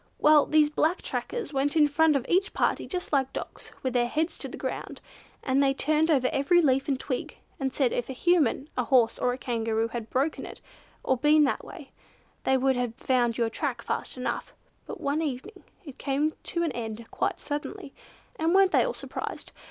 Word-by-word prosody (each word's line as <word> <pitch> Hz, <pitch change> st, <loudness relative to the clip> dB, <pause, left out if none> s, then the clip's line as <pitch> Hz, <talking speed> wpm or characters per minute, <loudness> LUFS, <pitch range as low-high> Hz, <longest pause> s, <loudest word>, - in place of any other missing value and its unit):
Well, 300 Hz, -1 st, +5 dB
these 305 Hz, -1 st, +4 dB
black 315 Hz, +3 st, +1 dB
trackers 455 Hz, -11 st, -4 dB
went 275 Hz, +3 st, 0 dB
in 300 Hz, -1 st, +6 dB
front 305 Hz, +1 st, +3 dB
of 270 Hz, -2 st, 0 dB
each 385 Hz, +3 st, +1 dB
party -, -, 0 dB
just 360 Hz, -4 st, -5 dB
like 270 Hz, -2 st, +2 dB
dogs, -, -, -7 dB
with 260 Hz, -2 st, -1 dB
their 240 Hz, -1 st, +2 dB
heads 315 Hz, +6 st, -1 dB
to -, -, -5 dB
the -, -, -8 dB
ground, -, -, -5 dB, 0.4 s
and 270 Hz, 0 st, +2 dB
they 270 Hz, -1 st, +3 dB
turned 310 Hz, +3 st, +2 dB
over 265 Hz, -5 st, +3 dB
every 315 Hz, +6 st, +3 dB
leaf 270 Hz, -4 st, +2 dB
and 270 Hz, -3 st, 0 dB
twig, 255 Hz, -3 st, -4 dB, 0.2 s
and 265 Hz, -1 st, -1 dB
said 260 Hz, -3 st, +1 dB
if 245 Hz, -, -2 dB
a -, -, -3 dB
Human, 295 Hz, -2 st, +2 dB
a 250 Hz, -, 0 dB
horse 235 Hz, -3 st, +3 dB
or 250 Hz, -, +2 dB
a 250 Hz, -, -3 dB
Kangaroo 225 Hz, -2 st, -1 dB
had 230 Hz, -1 st, -6 dB
broken 280 Hz, +5 st, 0 dB
it -, -, -9 dB, 0.4 s
or 260 Hz, -, +1 dB
been 300 Hz, +4 st, +5 dB
that 275 Hz, -, 0 dB
way, -, -, -11 dB, 0.5 s
they 265 Hz, -, +4 dB
would 265 Hz, 0 st, +2 dB
have 245 Hz, -2 st, -2 dB
found 245 Hz, -3 st, +1 dB
your 230 Hz, -2 st, 0 dB
track 250 Hz, -2 st, -3 dB
fast -, -, -3 dB
enough, 250 Hz, -, -4 dB, 0.3 s
but -, -, -7 dB
one 285 Hz, +3 st, 0 dB
evening 300 Hz, -, -5 dB, 0.2 s
it 280 Hz, -4 st, -11 dB
came 290 Hz, +3 st, 0 dB
to 340 Hz, -3 st, -1 dB
an 330 Hz, -, 0 dB
end 230 Hz, -2 st, -5 dB
quite -, -, -1 dB
suddenly, 290 Hz, -2 st, -5 dB, 0.4 s
and 325 Hz, +3 st, +1 dB
weren't 385 Hz, -1 st, +5 dB
they -, -, +4 dB
all -, -, -2 dB
surprised! -, -, -6 dB
275 Hz, 205 wpm, -27 LUFS, 250-310 Hz, 0.5 s, in